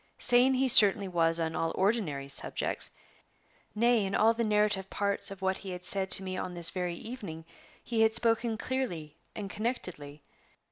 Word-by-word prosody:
Sane 250 +2 +3
he 265 +1 0
certainly 205 -4 +4
was 165 -2 +2
on 160 -1 -3
all 165 - -2
ordinary 185 -9 -2
subjects; 140 - 0 0.9
nay, 235 0 +2
in 195 0 -3
all 225 +1 +3
the 235 +1 -3
narrative 210 -3 0
parts 200 0 -2
of 195 -1 -11
what 190 0 -1
he 195 - -9
had 180 -1 -7
said 190 +1 +3
to 190 - +1
me 185 0 -6
on 185 -1 -6
this 170 -1 +4
very 180 -2 -4
evening 170 -7 -9 0.4
he 230 -2 -2
had 220 0 +3
spoken 230 -1 +5
clearly 180 - -5 0.2
and 205 -2 -6
connectedly. 180 - -5
195 Hz, 175 wpm, -28 LUFS, 175-225 Hz, 0.9 s, spoken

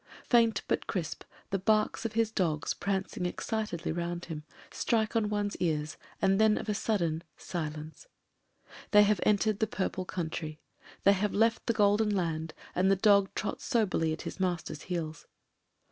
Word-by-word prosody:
Faint, 230 -3 +4
but - - 0
crisp, 170 -5 -3 0.3
the 195 - +1
barks 215 +3 +1
of 225 - -2
his 225 -1 +1
dog, 165 -8 0
prancing 190 -1 -1
excitedly 210 -4 -3
round 175 +1 -3
him, 155 -3 -6 0.3
strike 225 -1 0
on 215 -2 +2
one's 205 -1 -1
ears, 155 -3 -1 0.2
and 195 +1 +3
then 215 -1 +5
of - - -5
a 210 - +1
sudden 170 -7 0
— - - -43
silence. 155 - -5 0.8
They 210 0 +7
have 205 -2 +3
en 210 - +4
tered 215 0 0
the 220 - +2
purple 190 -2 -2
country; 160 -3 -4 0.4
they 200 - +7
have 200 +1 -1
left 225 +2 +2
the 230 - +3
golden 210 0 +3
land, 165 -5 -1 0.2
and 185 +2 +2
the 195 - +5
dog 200 -1 +4
trots 210 - -3
soberly 205 - +1
at 160 - -4
his - - -6
master's 175 -5 -2
heels. 160 -4 -4
195 Hz, 170 wpm, -30 LUFS, 170-215 Hz, 0.8 s, They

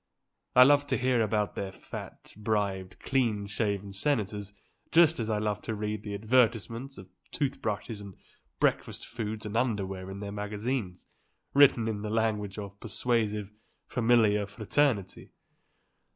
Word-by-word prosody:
I 125 - +10
love 145 +2 +5
to 130 - +1
hear 125 -2 +2
about 105 -1 0
their 95 -1 -4
fat, - - -9
bribed, 100 -3 -2
clean 115 -7 +1
shaven 100 -1 -2
senators; 105 -3 -1 0.4
just 165 -3 +5
as 110 -1 -2
I 110 - +1
love 105 -1 -1
to 110 - -3
read 105 0 -3
the 105 -1 -5
advertisements 115 +3 +1
of 95 - -10 0.2
tooth 140 -1 -2
brushes 105 0 -3
and 100 -3 -10 0.4
breakfast - - 0
foods 110 -2 -5
and 105 +1 -5
underwear 95 -6 -1
in 95 +1 -6
their 100 0 -5
magazines, 105 -1 -3 0.5
written 135 -5 +6
in 105 -2 -2
the 105 - -3
language 105 -3 0
of 100 -1 -7
persuasive, 110 -3 -1 0.3
familiar 110 -4 +3
fraternity. 105 0 0
105 Hz, 140 wpm, -29 LUFS, 100-120 Hz, 0.5 s, I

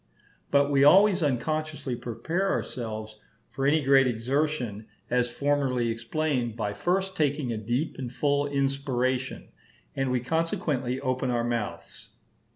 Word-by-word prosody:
But 140 0 +3
we 140 -1 +4
always 190 +5 +6
unconsciously 150 0 -1
prepare 160 - -2
ourselves 110 - -4 0.3
for 135 0 -1
any 150 +1 +3
great 135 -1 +5
exertion, 125 -2 -1 0.2
as 125 -1 +2
formerly 130 -2 0
explained, 120 0 -1
by 105 -3 -2
first 190 - -1
taking 145 -4 0
a - - -3
deep 120 +8 -2
and 125 -3 -4
full 145 +2 +1
inspiration, 135 -2 -1 0.5
and 135 -1 0
we 125 0 +1
consequently 135 -3 -1
open 130 -1 -1
our 120 -1 +1
mouths. 105 -8 -4
135 Hz, 130 wpm, -27 LUFS, 120-145 Hz, 0.5 s, always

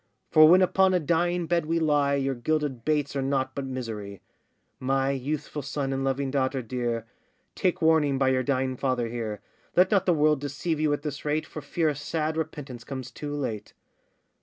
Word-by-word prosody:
For 155 0 +8
when 185 +2 +7
upon 190 0 +3
a - - +3
dying 175 +2 +1
bed 170 -1 0
we 165 +1 +1
lie, 145 -3 +2
Your 135 -1 0
gilded 135 -1 -1
baits 150 -1 0
are 135 - 0
nought 135 0 0
but 140 -1 -4
misery. 110 -7 -5 0.6
My 135 +1 +1
youthful 145 +2 -3
son 140 0 -3
and 135 0 -2
loving 135 0 -1
daughter 130 -1 0
dear, 120 -1 -2 0.5
Take 180 -3 0
warning 155 -4 +4
by 135 0 +3
your 130 -1 +2
dying 130 -1 -1
father 125 -3 0
here; 110 -3 -4 0.3
Let 185 +1 +5
not 195 -2 +3
the 180 - +5
world 150 -2 +3
deceive 145 +3 -2
you 155 -1 +2
at 145 - -3
this 145 -2 -5
rate, 150 +1 0
For 155 - -8
fear 165 +2 -1
a 150 - +2
sad 155 +2 -2
repentance 145 -6 -5
comes 130 -1 -6
too 145 +2 -5
late. 110 -7 -4
140 Hz, 190 wpm, -27 LUFS, 130-155 Hz, 0.6 s, For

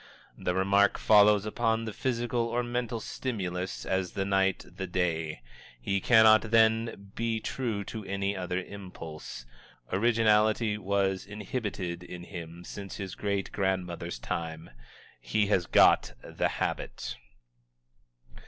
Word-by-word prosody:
The 90 - -2
remark 100 +1 +3
follows 105 -1 +5
upon 115 +1 0
the 110 - -5
physical 120 0 -1
or 120 +1 0
mental 120 -1 -2
stimulus 95 -7 -4
as 95 -2 -1
the 95 - -1
night 95 -1 +1
the 95 +1 -6
day; 80 -6 -1 0.4
he 100 +11 -1
cannot, 110 -1 +6
then, 110 -3 +2
be 115 -1 -1
true 110 -3 -2
to 110 +2 -7
any 100 +1 -1
other 90 -1 -2
impulse. 85 -10 -8 0.5
Originality 110 0 +3
was 100 -2 0
inhibited 105 -5 -4
in 90 0 -8
him 85 -1 -8
since 100 -1 -7
his 95 -2 -5
great 100 -2 -2
grandmother's 90 -5 -2
time. 80 +4 -5 0.5
He 110 -1 +1
has 90 -3 +2
"got - - +5
the - - -1
habit." - - -3
100 Hz, 125 wpm, -29 LUFS, 90-110 Hz, 0.5 s, cannot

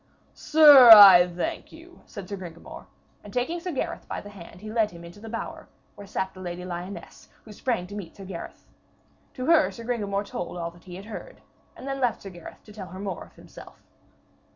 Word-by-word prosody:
'Sir, 290 -5 +7
I 195 -5 +10
thank 175 0 -5
you,' 340 +2 -16
said 200 -4 -10
Sir 200 - -5
Gringamor, 170 -3 -11 0.4
and 205 - -12
taking 255 +9 -2
Sir 360 +1 -6
Gareth 275 - -5
by - - -5
the 205 - -12
hand 175 -3 -13
he 215 0 -8
led 220 -2 +1
him 170 -2 -13
into 170 +4 -13
the 225 +1 -10
bower 230 0 -7 0.3
where 200 - -13
sat 190 -1 -4
the 185 - -14
Lady 180 -1 -7
Lyones, 175 0 -9 0.2
who 215 - -13
sprang 225 -4 -3
to 190 - -12
meet 200 -5 -8
Sir 195 - -11
Gareth. 185 -3 -9 0.7
To 255 - -5
her 320 0 +4
Sir 230 - -11
Gringamor 205 -4 -2
told 180 - -6
all 170 -1 -5
that 170 +1 -21
he 180 -2 -10
had 195 +2 -10
heard, 225 - -10 0.3
and 265 - -11
then 275 0 -4
left 245 -3 -1
Sir 195 - -9
Gareth 175 -2 -13
to 210 - -15
tell 200 -3 -9
her 185 +1 -11
more 195 -3 -6
of - - -23
himself. - - -15
200 Hz, 215 wpm, -25 LUFS, 180-235 Hz, 0.7 s, I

